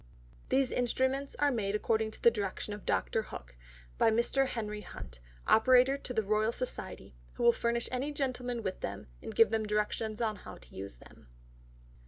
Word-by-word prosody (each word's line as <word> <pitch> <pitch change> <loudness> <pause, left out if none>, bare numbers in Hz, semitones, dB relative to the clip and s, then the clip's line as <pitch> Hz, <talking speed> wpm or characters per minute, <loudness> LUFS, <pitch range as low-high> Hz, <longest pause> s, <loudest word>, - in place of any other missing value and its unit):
These 265 0 +3
Instruments 260 +3 0
are 290 0 +3
made 210 -5 -1
according 220 +1 +1
to 220 - -10
the 235 - +8
Direction 205 -1 -3
of 205 - -9
Dr. 225 - +1
Hook, - - -9 0.4
by - - +6
Mr. 235 +4 +2
Henry 210 -4 -4
Hunt, 60 - -9 0.3
Operator 255 +3 +6
to 280 - -6
the 220 -3 +1
Royal 215 +2 +2
Society, 250 - -4 0.2
who - - -4
will 235 - +8
furnish 235 0 0
any 260 +4 -1
Gentlemen 250 -4 -2
with 190 -2 -3
them, - - -5 0.2
and - - -7
give 225 - +6
them 220 -1 0
Directions 210 +1 -1
how 215 -6 -3
to - - -17
use 95 -8 -6
them. - - -17
225 Hz, 175 wpm, -32 LUFS, 210-255 Hz, 0.4 s, the